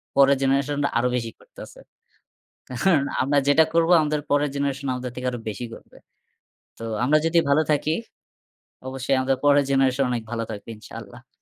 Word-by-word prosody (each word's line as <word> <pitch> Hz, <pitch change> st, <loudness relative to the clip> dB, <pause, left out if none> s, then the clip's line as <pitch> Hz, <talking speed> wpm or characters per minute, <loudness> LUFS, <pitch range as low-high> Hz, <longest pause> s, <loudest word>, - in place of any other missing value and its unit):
পরের 140 Hz, 0 st, +5 dB
generation 140 Hz, +1 st, +1 dB
রা 140 Hz, -, +1 dB
আরও 125 Hz, +1 st, +1 dB
বেশি 115 Hz, -2 st, -3 dB
করতেছে। -, -, -13 dB, 0.9 s
কারণ 140 Hz, +4 st, +1 dB, 0.2 s
আমরা 140 Hz, +2 st, +1 dB
যেটা 160 Hz, +3 st, +6 dB
করব 165 Hz, 0 st, +3 dB
আমাদের 150 Hz, -1 st, -1 dB
পরের 145 Hz, 0 st, +2 dB
generation 140 Hz, 0 st, -2 dB
আমাদের 125 Hz, 0 st, -5 dB
থেকে 125 Hz, 0 st, -4 dB
আরও 120 Hz, -, -5 dB
বেশি 115 Hz, +4 st, -6 dB
করবে। -, -, -16 dB, 0.8 s
তো 115 Hz, -, -7 dB, 0.2 s
আমরা 155 Hz, +4 st, +4 dB
যদি 170 Hz, +1 st, +3 dB
ভালো 150 Hz, +3 st, +4 dB
থাকি 150 Hz, +1 st, 0 dB, 1.0 s
অবশ্যই 135 Hz, 0 st, -1 dB
আমাদের 130 Hz, 0 st, 0 dB
পরের 145 Hz, 0 st, +5 dB
generation 135 Hz, 0 st, +2 dB
অনেক 120 Hz, -2 st, -2 dB
ভালো 115 Hz, -1 st, -2 dB
থাকবে 105 Hz, 0 st, -8 dB
ইনশাল্লাহ। 120 Hz, +4 st, -13 dB
135 Hz, 165 wpm, -23 LUFS, 125-145 Hz, 1.0 s, যেটা